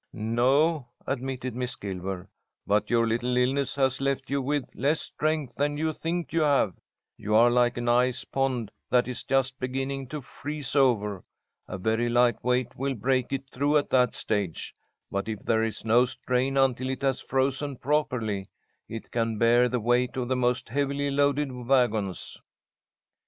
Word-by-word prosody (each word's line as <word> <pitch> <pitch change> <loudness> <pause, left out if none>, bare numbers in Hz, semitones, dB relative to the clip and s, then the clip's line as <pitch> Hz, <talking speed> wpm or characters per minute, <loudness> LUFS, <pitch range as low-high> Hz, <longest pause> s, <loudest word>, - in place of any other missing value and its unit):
"No," 130 +7 +2 0.2
admitted 130 -2 -3
Miss 125 0 -2
Gilmer, 95 -2 -5 0.4
"but 105 +1 +1
your 115 -1 +3
little 120 +2 0
illness 135 +3 +1
has 135 -1 +1
left 135 -1 -1
you 140 0 +1
with 140 0 -1
less 145 +5 +1
strength 155 -5 -2
than 145 +3 -1
you 160 +1 0
think 170 +2 -3
you 165 - +2
have. 140 -10 +3 0.4
You 105 +1 -1
are 120 +2 +6
like 120 0 +2
an 120 0 -3
ice 125 +1 +2
pond 130 -5 -1 0.2
that 125 0 +3
is 125 -1 -4
just 135 -1 0
beginning 135 +1 -3
to 150 +4 -5
freeze 145 +1 -6
over. 105 -8 +2 0.4
A - - -5
very 110 +5 0
light 120 0 +3
weight 125 0 0
will 135 +1 -2
break 130 +3 0
it 135 0 -3
through 145 +3 +2
at 145 - -1
that 125 -2 +3
stage, 100 -6 -2 0.4
but 100 +1 -2
if 110 -2 -4
there 110 -1 +2
is 115 0 -3
no 120 +3 +5
strain 130 +1 -1
until 130 -1 +2
it 130 +1 -4
has 135 -2 +1
frozen 135 +1 -1
properly, 115 -10 -1 0.4
it 115 - -7
can 115 -2 -1
bear 120 +2 +4
the 125 - 0
weight 120 +3 +1
of 125 -1 -2
the 130 - +2
most 125 -1 0
heavily 140 +2 -1
loaded 140 0 +1
wagons." 120 -6 0
125 Hz, 170 wpm, -27 LUFS, 115-135 Hz, 0.4 s, are